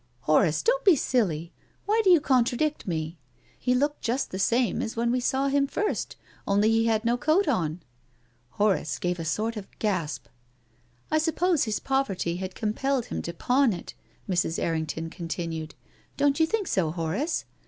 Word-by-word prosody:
" - - -39
Horace, 155 +4 +3
don't - - +2
be 380 -5 +7
silly! 180 - 0 0.3
Why 435 +2 +3
do 385 - +4
you 350 -3 +7
contra 250 -3 +2
dict 305 -4 -1
me? 160 -1 -3 0.4
He 250 0 +1
looked 290 +3 0
just 260 +3 -1
the 190 - -4
same 235 +1 +2
as 225 - -4
when 235 +1 +1
we 250 - +1
saw 265 +2 +1
him 280 0 +2
first, 420 +8 -2 0.3
only 205 +2 +3
he 225 0 +3
had 220 0 +1
no 240 +1 +2
coat 315 +9 +2
on." 175 - -1 0.7
Horace 200 - 0
gave 175 0 -2
a - - -3
sort 220 +7 -1
of 200 - -7
gasp. 165 - -2 0.4
" 120 +1 -37
I 310 - +3
suppose 325 0 +1
his 215 -2 -1
poverty 200 -11 -1
had 185 0 -5
compelled 245 +4 -1
him - - -4
to 170 - -4
pawn 250 +7 +2
it," 175 - -8 0.3
Mrs. 175 -3 0
Errington 160 0 -2
continued. 165 -2 -5 0.2
" - - -34
Don't 285 0 +2
you 320 - +4
think 435 +2 -1
so, 170 -5 +1
Horace? 170 - -2
220 Hz, 185 wpm, -26 LUFS, 170-275 Hz, 0.7 s, be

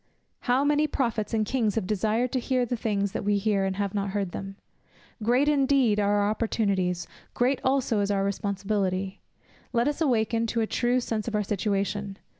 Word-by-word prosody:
"How 255 +2 +2
many 295 +1 +3
prophets 230 -7 -1
and 220 -2 +1
kings 225 -3 0
have 220 -4 0
desired 215 +5 0
to 260 - 0
hear 255 0 0
the 245 - -2
things 200 -3 -1
that - - -4
we 205 0 +2
hear, 200 -1 +1
and 190 0 -1
have 200 -1 -2
not 200 -1 -1
heard 195 -2 -2
them!" 195 +2 -6 0.7
Great 245 +6 +3
indeed 270 -6 +3
are 205 0 +2
our 205 - +2
opportunities, 200 -5 0 0.3
great 255 +2 +1
also 260 -5 +1
is 200 0 0
our 200 -1 +1
responsibility. 195 -1 -2 0.5
Let 240 +2 +2
us 295 +2 -2
awaken 230 -5 +1
to 230 +1 0
a - - +2
true 245 +3 +1
sense 225 -2 -3
of 225 - -2
our 210 - +1
situation. 200 0 -2
215 Hz, 190 wpm, -27 LUFS, 200-245 Hz, 0.7 s, many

